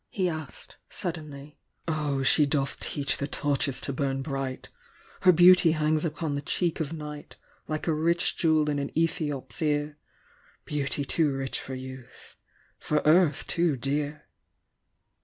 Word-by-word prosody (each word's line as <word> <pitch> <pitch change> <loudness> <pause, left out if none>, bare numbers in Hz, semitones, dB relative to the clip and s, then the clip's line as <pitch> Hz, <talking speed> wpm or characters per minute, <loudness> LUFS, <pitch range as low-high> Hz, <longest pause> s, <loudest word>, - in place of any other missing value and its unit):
he 185 -3 0
asked, 160 -5 -6
suddenly: 150 -4 -5 0.3
"0, 150 -4 0
she 145 +2 +4
doth 140 -1 -1
teach 140 -2 -1
the 140 - -3
torches 145 -2 0
to 140 - -4
bum 135 0 -1
bright! 135 -3 -4 0.5
Her 185 - +7
beauty 180 -1 +7
hangs 155 0 +1
upon 160 -2 -2
the 140 - -2
cheek 170 +2 0
of 155 -2 -2
night, 150 -2 -8 0.3
Like 155 0 -3
a 165 - +1
rich 170 +3 +1
Jewel 155 -2 +2
in 145 -1 0
an 140 - -3
Ethiop's 150 -5 -1
ear^ 150 -1 0 0.7
Beauty 145 -1 -2
too 150 +2 +2
rich 135 -1 -2
for 130 - -6
use, 130 -1 -10 0.4
for 150 -1 0
earth 155 -2 +4
too 170 -5 +1
djar!" 145 +3 -2
150 Hz, 145 wpm, -27 LUFS, 140-160 Hz, 0.7 s, Her